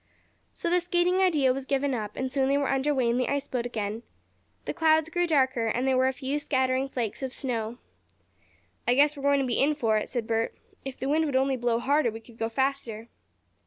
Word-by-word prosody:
So - - -4
the 355 0 +3
skating 355 +1 +1
idea 310 -9 +3
was 265 0 -6
given 275 0 0
up, 210 -3 -4
and 260 0 -3
soon 265 0 +1
they 280 - +3
were 285 -1 0
under 270 +2 +1
way 260 -4 +1
in 235 +1 +1
the 255 - 0
ice 280 0 -1
boat 245 -2 -2
again. 215 -1 -4 0.6
The - - -3
clouds 315 0 +3
grew 350 0 +1
darker, 260 -7 +2
and 245 +4 0
there 265 - +3
were 260 0 +3
a - - +2
few 270 +2 -3
scattering 260 -2 0
flakes 235 -4 -3
of 265 -1 -3
snow. 235 -3 -3 1.1
"I 245 - +4
guess 290 +2 +4
we're 280 - -8
going 280 0 +3
to - - 0
be 240 -2 0
in 295 +2 +3
for 225 -6 +1
it," 215 - -3
said 240 -3 -2
Bert. 225 0 -1 0.3
"If 270 -1 -6
the 265 - -4
wind 315 +3 +2
would 285 -3 -2
only 265 +1 +2
blow 240 -2 0
harder 275 +2 +2
we 225 0 -7
could 225 0 -18
go 225 - -1
faster." 235 -3 -2
265 Hz, 235 wpm, -27 LUFS, 240-285 Hz, 1.1 s, I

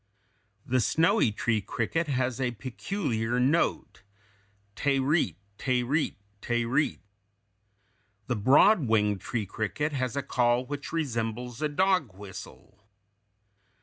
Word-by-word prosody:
The 130 +1 +1
snowy 155 -3 +3
tree 110 +1 0
cricket 135 - -2
has 130 -2 -1
a 130 - +1
peculiar 125 - -2
note, 140 +7 +1 0.7
te 140 +2 +1
reat, 145 +5 +1 0.2
te 125 -2 +1
reat, 145 +6 0 0.3
te 120 -1 0
reat. 130 -2 0 1.2
The 125 - -1
broad 140 - +5
winged 105 -3 +2
tree 115 -4 -3
cricket 110 +10 -2
has 130 -2 -2
a 140 - -1
call 120 -1 +1
which 145 +1 -6
resembles 120 -5 -3
a 150 - +1
dog 180 - +1
whistle. 100 +1 -11
125 Hz, 115 wpm, -28 LUFS, 115-145 Hz, 1.2 s, broad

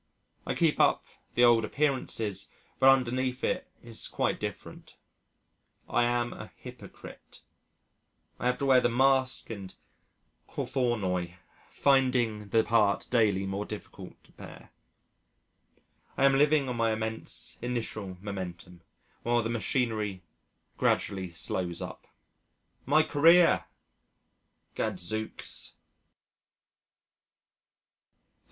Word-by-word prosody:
I - - -1
keep - - +2
up - - +3 0.3
the 120 - +4
old 120 -2 +6
appearances 115 -7 -1 0.3
but 135 - +7
underneath 130 0 +1
it - - -1 0.2
is 115 -2 -7
quite - - -1
different. - - -7 0.9
I 120 - +2
am 120 0 0
a 110 - -10
hypocrite. 125 -5 -12 1.0
I 120 - -1
have 125 - +1
to 140 - -2
wear 130 -2 +5
the 120 - +2
mask 130 0 +2
and 100 -4 -8 0.7
cothornoi, 95 -9 -1 0.3
finding 120 - +2
the 110 +2 +3
part 110 -4 +2
daily 105 -5 +2
more 95 +1 -3
difficult 105 0 -9
to - - -24
bear. - - -13 1.5
I 135 - +4
am 135 0 +5
living 145 0 +3
on 125 -2 -3
my 115 -1 +2
immense 110 0 -5
initial 110 -6 -4
momentum 90 -3 -7 0.4
while 120 0 +1
the 115 - -2
machinery 110 -5 -1 0.5
gradually 95 -3 0
slows 85 0 -3
up. - - -7 0.8
My 155 +3 +5
career! 165 +3 +5 1.1
Gadzooks. 110 +1 -4
115 Hz, 105 wpm, -29 LUFS, 100-130 Hz, 1.5 s, but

